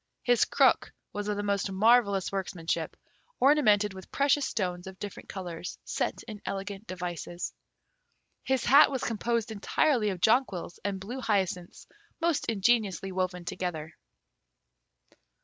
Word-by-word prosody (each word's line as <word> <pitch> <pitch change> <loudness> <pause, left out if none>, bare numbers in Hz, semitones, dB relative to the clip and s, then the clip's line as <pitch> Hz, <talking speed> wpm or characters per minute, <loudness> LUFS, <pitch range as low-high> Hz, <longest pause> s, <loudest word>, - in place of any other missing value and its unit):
His 245 -2 +4
crook - - +3 0.2
was 205 0 -4
of 210 -1 -1
the 205 - -2
most 200 -1 0
marvellous 200 -1 +3
workmanship, 185 -4 -3 0.4
ornamented 215 -8 +4
with 190 -1 -11
precious 280 0 +2
stones 180 -5 -3
of 190 0 -9
different 205 -1 -8
colours 175 -3 -6
set - - -2
in 210 -3 -9
elegant 195 +2 -5
devices. 175 -1 -5 0.9
His 265 -2 0
hat 275 +4 +7
was 265 -3 -3
composed 230 0 -1
entirely 220 +2 +1
of 185 -3 -4
jonquils 220 -6 +1
and 200 -1 -2
blue 240 +8 -6
hyacinths 190 -6 -1 0.3
most 330 -3 0
ingeniously 200 -3 +1
woven 180 -1 -2
together. 160 -3 -4
200 Hz, 130 wpm, -29 LUFS, 185-235 Hz, 0.9 s, hat